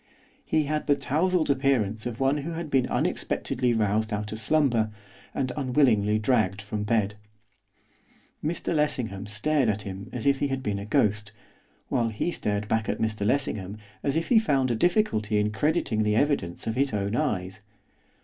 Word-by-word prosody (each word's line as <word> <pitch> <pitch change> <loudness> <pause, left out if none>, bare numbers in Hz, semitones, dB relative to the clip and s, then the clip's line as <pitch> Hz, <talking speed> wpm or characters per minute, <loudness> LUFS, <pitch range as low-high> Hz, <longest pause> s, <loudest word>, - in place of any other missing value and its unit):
He 155 -1 +1
had 150 +1 -2
the 145 - +5
tousled 160 +3 +1
appearance 125 -6 +1
of 120 -1 -6
one 135 +2 +2
who 155 +4 -4
had 165 -2 -5
been 130 -2 +3
unexpectedly 125 0 -1
roused 110 0 +1
out 105 0 -3
of 110 - -5
slumber, 120 -3 +2 0.5
and 130 -2 -1
unwillingly 125 -7 +3
dragged 110 -4 +1
from 105 +1 -4
bed. 105 -2 +1 1.3
Mr 165 +3 -1
Lessingham 125 -10 -1
stared 130 +5 +1
at 105 0 -1
him 95 +2 -7
as 125 - -5
if 140 -1 +3
he 145 - +1
had 135 -1 -3
been 100 -3 -1
a 100 - -7
ghost, 105 0 +1 0.6
while 120 -3 +1
he 110 +10 -2
stared 105 -7 -2
back 110 0 0
at - - 0
Mr 110 -2 -1
Lessingham 105 -6 -1 0.2
as 140 0 0
if 165 +1 -1
he 235 - +6
found 135 - +1
a - - +1
difficulty 110 - +1
in 105 0 +1
crediting 145 -3 0
the 105 0 +2
evidence 110 - 0
of 110 - -1
his 135 +1 0
own 100 +2 -1
eyes. 95 -10 -1
115 Hz, 175 wpm, -26 LUFS, 105-140 Hz, 1.3 s, he